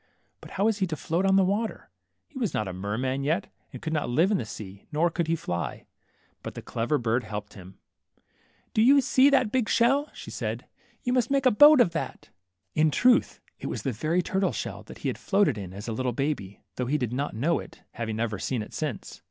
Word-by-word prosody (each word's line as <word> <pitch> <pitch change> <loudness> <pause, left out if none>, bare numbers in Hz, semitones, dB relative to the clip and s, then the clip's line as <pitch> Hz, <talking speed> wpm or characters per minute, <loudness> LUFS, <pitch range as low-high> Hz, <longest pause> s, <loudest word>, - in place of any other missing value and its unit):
But - - -12
how 195 - +2
was 220 -1 +2
he 190 - +1
to 160 - -3
float 170 +5 0
on 190 - +4
the 195 - +5
water? 210 +4 -2 0.4
He 290 -4 -9
was 230 -6 -1
not 105 - -1
a 95 - -4
merman 115 +9 -2
yet, 165 +8 -1 0.2
and - - -10
could 160 - -2
not 150 -5 -1
live 165 +11 +3
in 200 - +2
the - - -3
sea, 100 -3 -9
nor 165 +3 +2
could 170 -1 -1
he 165 - +2
fly. 85 - -4 0.6
But - - -7
the - - -7
clever 120 +6 -1
bird 120 0 0
helped 105 -1 -6
him. 95 -1 -12 1.0
^^Do 220 - +4
you 275 +4 +7
see 265 +1 +5
12 - - -1
THE - - +6
MERMAID, 260 -2 +4
that 210 - -6
big 250 -4 +1
shell?'' 270 +6 +3
she - - -10
said; - - -4 0.4
jou 245 - +1
must 245 -2 +2
make 275 -1 +1
a 255 - +6
boat 295 +6 +8
of 210 -8 +5
that." 165 - -5 0.4
In 155 0 +3
truths 245 - +3 0.2
it - - -5
was - - -4
the 135 - 0
very 155 +10 0
turtle 190 +3 0
shell - - -5
that - - -10
he - - +2
had - - -5
floated 200 - +2
in 95 -4 -7
as 100 +4 -8
a 115 - -2
little 125 +2 -1
baby, 120 -7 -3
though 125 - -1
he 150 +4 +1
did 125 -4 -2
not 140 0 -2
know 155 +10 +1
it, - - -12
having 110 -1 -4
never 110 -2 -2
seen 120 +1 -2
it - - -13
since. 150 -8 -5
155 Hz, 240 wpm, -27 LUFS, -, 1.0 s, boat